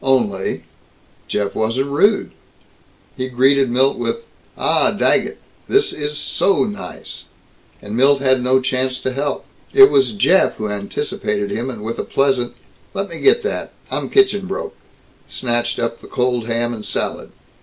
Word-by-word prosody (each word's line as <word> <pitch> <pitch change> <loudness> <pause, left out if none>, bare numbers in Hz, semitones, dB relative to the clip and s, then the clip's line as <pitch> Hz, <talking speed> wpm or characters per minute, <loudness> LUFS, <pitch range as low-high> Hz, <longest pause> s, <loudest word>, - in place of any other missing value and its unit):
Only 115 -8 0 0.6
Jeff 100 -1 -1
wasn't 125 +6 -1
rude. 200 +9 +2 0.8
He 130 0 -3
greeted 135 +1 +3
Milt 130 +3 +2
with, 465 - -2 0.3
"Ah, - - +3
Daggett! - - +1 0.3
This 410 - +3
is 150 0 -3
so 195 +5 +2
nice!" 205 -1 -6 0.6
And 105 +1 -6
Milt 135 +3 +4
had 130 -2 +2
no 130 +1 +3
chance 130 0 -1
to 130 - -2
help. 140 +2 -2 0.3
It 405 0 +9
was 400 - +3
Jeff 190 -2 +3
who 105 -1 -4
anticipated 105 0 -3
him 120 +5 -2
and 115 -5 -7
with 115 +1 -4
a - - -1
pleasant, 130 -3 0 0.4
"Let 195 0 -2
me 170 - -7
get 455 +3 +4
that - - -4 0.2
I'm - - -2
kitchen 205 - +3
broke," 195 - -4 0.5
snatched 120 -1 -1
up 115 0 -3
the - - -12
cold 125 -2 -1
ham 120 +1 -1
and 110 -2 -7
salad. - - -3
130 Hz, 155 wpm, -19 LUFS, 120-150 Hz, 0.8 s, It